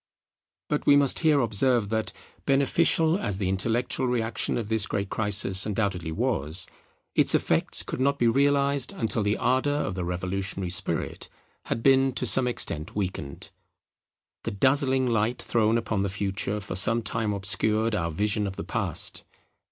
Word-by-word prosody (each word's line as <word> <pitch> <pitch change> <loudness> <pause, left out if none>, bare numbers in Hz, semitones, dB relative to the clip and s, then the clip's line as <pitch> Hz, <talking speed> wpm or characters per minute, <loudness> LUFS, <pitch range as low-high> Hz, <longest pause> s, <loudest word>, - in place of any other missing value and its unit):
But 150 - -2
we 145 - +7
must 140 -2 +3
here 155 -4 +3
observe 115 -1 +1
that, 110 -2 -2 0.4
beneficial 160 +5 +2
as 100 - -2
the 95 -2 -2
intellectual 115 +6 -1
reaction 120 -2 -1
of 115 -3 -4
this 110 -1 0
great 100 -1 -3
crisis 100 -2 +2
undoubtedly 100 -6 -2
was, 95 - -1 0.5
its - - +4
effects - - +1
could - - -5
not 140 +1 +2
be 120 - +2
realized 140 +1 +1
until 115 -1 -1
the 105 +1 0
ardour 130 +3 +1
of 125 -9 -2
the 90 -1 -4
revolutionary 95 +1 -3
spirit 90 - -2 0.4
had 115 - -3
been 135 -1 +4
to 125 - -3
some 125 +2 +2
extent 80 -9 -1
weakened. 90 -8 -5 0.9
The - - -2
dazzling 130 +4 +2
light 115 0 0
thrown 115 0 +1
upon 110 -3 -2
the 100 - -1
Future 100 +1 -2
for 100 - -6
some 115 +5 +2
time 115 -1 -1
obscured 105 +3 +1
our 85 -5 -1
vision 105 +5 0
of 95 - -6
the - - -5
Past. - - -2
110 Hz, 160 wpm, -26 LUFS, 100-130 Hz, 0.9 s, we